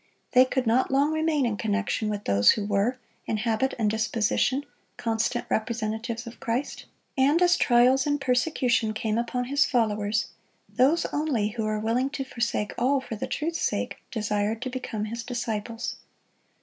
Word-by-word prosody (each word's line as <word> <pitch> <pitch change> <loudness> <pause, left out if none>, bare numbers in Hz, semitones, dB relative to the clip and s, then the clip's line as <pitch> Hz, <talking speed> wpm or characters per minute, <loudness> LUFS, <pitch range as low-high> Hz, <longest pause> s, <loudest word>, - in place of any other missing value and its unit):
They 255 0 +7
could 260 0 -1
not 235 +3 +2
long 280 +3 +2
remain 315 -3 +1
in 220 -3 -1
connection 215 0 -1
with 205 -1 -3
those 100 +1 +5
who 210 - -3
were, 205 +5 +1 0.3
in 220 - 0
habit 225 +4 0
and 220 -3 +1
disposition, 220 +5 +1 0.3
constant 230 +1 -1
representatives 225 +1 -2
of 235 - -10
Christ; 240 +5 -3 0.3
and 280 +4 +3
as 355 0 +5
trials 255 +3 +4
and 290 0 +1
persecution 250 -4 +1
came 220 0 -1
upon 245 +1 -2
His 280 +3 +3
followers, 215 -3 0 0.4
those 280 +7 +2
only 280 -9 0
who 220 0 -3
were 215 0 -1
willing 235 +5 0
to 270 - -2
forsake 235 -5 -2
all 270 +3 +3
for 260 -3 -6
the 210 - -4
truth's 330 +2 -2
sake - - -1
desired 210 -1 -1
to 255 - -4
become 225 -4 -4
His 230 +2 -5
disciples. 230 -1 -4
235 Hz, 160 wpm, -26 LUFS, 215-265 Hz, 0.4 s, They